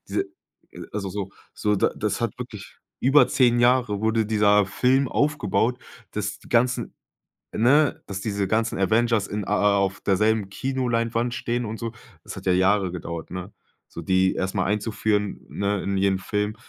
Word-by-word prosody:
Diese 385 - -1 0.7
also 100 -2 -3
so 95 0 -5 0.2
so 105 0 0
d - - +3
das - - -2
hat - - -2
wirklich - - -9 0.2
über 135 +4 +5
10 120 -2 +3
Jahre 120 -4 +3
wurde 110 0 +1
dieser 105 -1 +3
Film 130 +6 +2
aufgebaut, 125 -5 0 0.3
dass 105 0 -3
die - - -17
ganzen, 125 +1 +1 0.6
ne, 140 +6 +3
dass 100 -1 -5
diese 100 -2 -1
ganzen 110 +2 0
Avengers 110 +1 +2
in 105 0 -3
a - - 0
a 105 -1 +3
auf 100 -1 0
derselben 105 +1 +1
Kinoleinwand 120 -1 -1
stehen 120 0 -2
und 110 +1 -5
so. 115 -1 -4 0.3
Das - - -8
hat - - -9
ja 95 - +3
Jahre 95 0 +2
gedauert, 85 -2 -6
ne? 90 +2 -6 0.4
So - - -8
die 95 +2 +2
erst 95 +1 -2
mal 95 -2 +1
einzuführen, 105 0 -1
ne, 100 -1 -1
in 100 0 -1
jeden 95 0 +2
Film. 105 +2 -2
105 Hz, 170 wpm, -24 LUFS, 100-120 Hz, 0.7 s, über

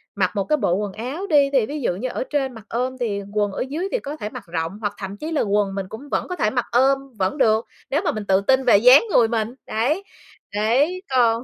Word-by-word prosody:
mặc 185 -2 +1
một 200 - +1
cái 305 +8 +1
bộ 175 - +1
quần 205 0 -3
áo 270 - -5
đi 285 -4 +4
thì 255 -5 +4
ví 290 +4 -5
dụ 180 - 0
như 250 +6 -3
ở - - -3
trên 270 -3 -1
mặc 225 -2 -12
ôm 255 +2 -2
thì 205 -4 -1
quần 205 -1 +1
ở - - -4
dưới 335 +7 -2
thì - - 0
có 285 +1 -6
thể 210 -9 -5
mặc - - -9
rộng 165 +3 -3
hoặc 205 - -2
thậm 195 0 -6
chí 315 +6 -5
là 310 - +1
quần 200 -1 0
mình 195 -1 -3
cũng 275 +6 -9
vẫn - - -1
có 360 - -4
thể 215 - +1
mặc 245 +1 -1
ôm 270 +3 +4 0.2
vẫn 190 +10 -1
được, 220 -3 +3 0.2
nếu 295 +4 +1
mà - - +2
mình 215 -1 -5
tự 195 0 +3
tin 260 +5 +2
về 235 -5 +7
dáng 250 - +7
người 230 -8 +5
mình, 225 0 -2
đấy, 285 - 0 0.5
đấy, 270 - +2
còn 235 -2 +3
235 Hz, 260 wpm, -22 LUFS, 205-275 Hz, 0.5 s, về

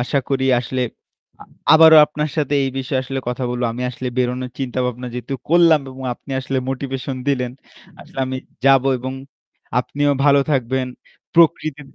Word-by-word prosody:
আশা 125 +3 0
করি 135 -1 0
আসলে 125 +1 -3 0.6
আ - - -15 0.3
আবারও 160 0 +8
আপনার 150 0 -3
সাথে 145 -2 0
এই 135 - -1
বিষয়ে 130 0 -1
আসলে 135 +1 -4
কথা 125 +1 -3
বলবো। 125 0 -2
আমি 125 +2 -5
আসলে 125 0 -5
বেরোনোর 125 0 -1
চিন্তাভাবনা 125 -1 -3
যেহেতু 125 +2 -4
করলাম 165 -2 +5
এবং 130 0 -9
আপনি 135 - -16
আসলে 135 0 -2
motivation 135 0 -4
দিলেন। 125 -3 0 0.5
আসলে - - -13
আমি 130 - -3 0.3
যাব 135 -1 +6 0.2
এবং 130 +2 -5 0.7
আপনিও 145 +3 0
ভালো 140 -1 +5
থাকবেন। 130 -1 0 0.5
প্রকৃতি 155 -3 +3
130 Hz, 155 wpm, -20 LUFS, 125-145 Hz, 0.7 s, আবারও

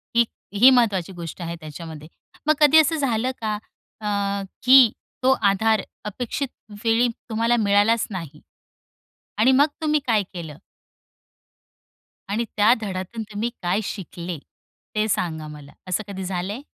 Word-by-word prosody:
ही 235 0 +5 0.3
ही 225 +6 +7
महत्त्वाची 210 -8 +2
गोष्ट 170 0 -8
आहे 170 0 -4
त्याच्यामध्ये. 155 0 -9 0.4
मग 310 - +6
कधी 300 0 +6
असं 315 +1 +3
झालं 255 -4 0
का 215 -1 -1 0.4
अ, 210 - -4 0.6
की 255 -2 +8 0.3
तो 260 - +5 0.2
आधार 220 +1 +2 0.2
अपेक्षित 245 +6 -3 0.4
वेळी 230 +1 +3 0.2
तुम्हाला 230 +2 +2
मिळालाच 205 +2 +3
नाही, 165 -6 -7 1.0
आणि 240 +5 +5
मग 280 +3 +5 0.2
तुम्ही 305 -1 +2
काय 220 -3 +3
केलं? 160 -4 -7 1.7
आणि 220 +4 -1
त्या 210 +3 +6
धड्यातून 195 +3 -4
तुम्ही 215 +3 -2
काय 180 +3 +1
शिकले? 180 -3 -6 0.6
ते 215 0 +1
सांगा 160 -5 -1
मला. 150 -2 -11 0.2
असं 185 +4 -1
कधी 190 -1 -6
झालंय? 190 +5 -3
210 Hz, 135 wpm, -23 LUFS, 180-235 Hz, 1.7 s, की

